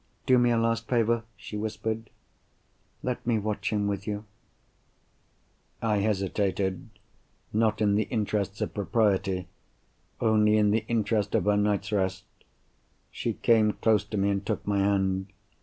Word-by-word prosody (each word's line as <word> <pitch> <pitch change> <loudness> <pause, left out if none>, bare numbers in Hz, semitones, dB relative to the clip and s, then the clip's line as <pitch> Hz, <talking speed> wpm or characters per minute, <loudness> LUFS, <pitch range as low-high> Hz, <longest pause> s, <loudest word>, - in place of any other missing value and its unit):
"Do 130 -1 +5
me 120 0 +4
a 120 - +2
last 115 0 0
favour?" 115 -1 +1
she 105 - -9
whispered. 110 +1 -3 0.9
"Let 125 -1 -2
me 120 -2 +3
watch 105 0 -2
him 105 -1 0
with 100 -1 -3
you." 105 0 -3 1.5
I 110 -2 +1
hesitated—not 100 +2 -2
in 100 -1 +3
the 105 +2 +2
interests 105 -3 -1
of - - -2
propriety; 100 -3 +1 0.7
only 110 -1 +4
in 105 -1 +3
the 110 +1 +1
interest 110 -3 0
of - - +1
her 105 0 +3
night's 105 0 0
rest. 95 -2 0 0.9
She - - -2
came 110 -2 +3
close 110 -3 +2
to 105 0 -5
me, 100 +1 +2
and 100 0 -1
took - - -3
my 100 -1 +1
hand. 95 -1 +1
105 Hz, 140 wpm, -27 LUFS, 100-110 Hz, 1.5 s, Do